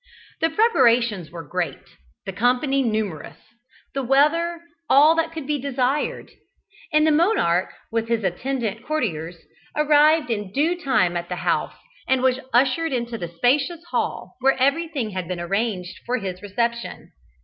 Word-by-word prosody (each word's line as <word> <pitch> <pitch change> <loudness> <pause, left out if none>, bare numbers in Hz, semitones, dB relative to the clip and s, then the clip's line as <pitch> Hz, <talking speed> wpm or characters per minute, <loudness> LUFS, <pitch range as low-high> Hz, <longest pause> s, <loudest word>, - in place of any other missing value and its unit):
The 325 - +2
preparations 240 - +2
were 165 -3 -9
great 175 -6 -2 0.5
the 195 - -5
company 250 +6 +1
numerous 210 - -3 0.6
the 275 - -1
weather 310 +6 +2 0.3
all 295 +4 +7
that 330 0 0
could 320 -3 -6
be 295 -1 -1
desired, 270 +1 -1 0.6
and 305 0 +4
the 315 - +4
monarch, 300 - +2 0.2
with 230 0 -1
his 230 -2 0
attendant 225 +3 -2
courtiers, 175 - -3 0.3
arrived 300 -2 +4
in 205 -4 -3
due 310 - +1
time 185 -10 +2
at 175 0 -4
the 180 - -2
house, - - 0 0.3
and 260 -1 +2
was 260 0 +2
ushered 270 +6 +2
into 235 -1 -2
the 175 - -4
spacious 275 - 0
hall, - - -3
where 270 +1 +3
everything 275 -3 0
had 185 -2 -4
been 180 -1 -4
arranged 185 0 -2
for 250 +1 +1
his 185 -4 -5
reception. 235 +3 -3
250 Hz, 150 wpm, -23 LUFS, 195-295 Hz, 0.6 s, all